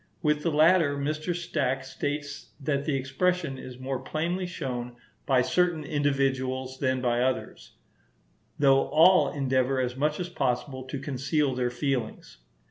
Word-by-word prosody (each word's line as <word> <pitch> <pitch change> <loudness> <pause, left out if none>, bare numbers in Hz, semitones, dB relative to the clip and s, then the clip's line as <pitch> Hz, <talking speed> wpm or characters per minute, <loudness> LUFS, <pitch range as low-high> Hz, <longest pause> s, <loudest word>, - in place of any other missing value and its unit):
With 150 -1 +2
the 170 - 0
latter, 155 -1 +4
Mr. 155 +4 -2
Stack 135 -6 -1
states 145 +1 -5
that 140 0 -1
the 150 - 0
expression 135 +2 -1
is 130 -1 -9
more 130 0 -3
plainly 170 +7 -2
shown 125 -8 -5 0.3
by 130 -3 +4
certain 175 +2 +1
individuals 130 -2 -1
than 130 -1 0
by 120 -1 +1
others, 125 - -2 0.8
though 135 -1 +4
all 180 +4 +5
endeavour 130 -1 +1
as 125 -1 -1
much 150 +3 0
as 180 - -2
possible 130 -4 -2
to 130 +2 -5
conceal 140 +1 -1
their 125 -1 0
feelings. 125 - -3
135 Hz, 140 wpm, -27 LUFS, 130-155 Hz, 0.8 s, all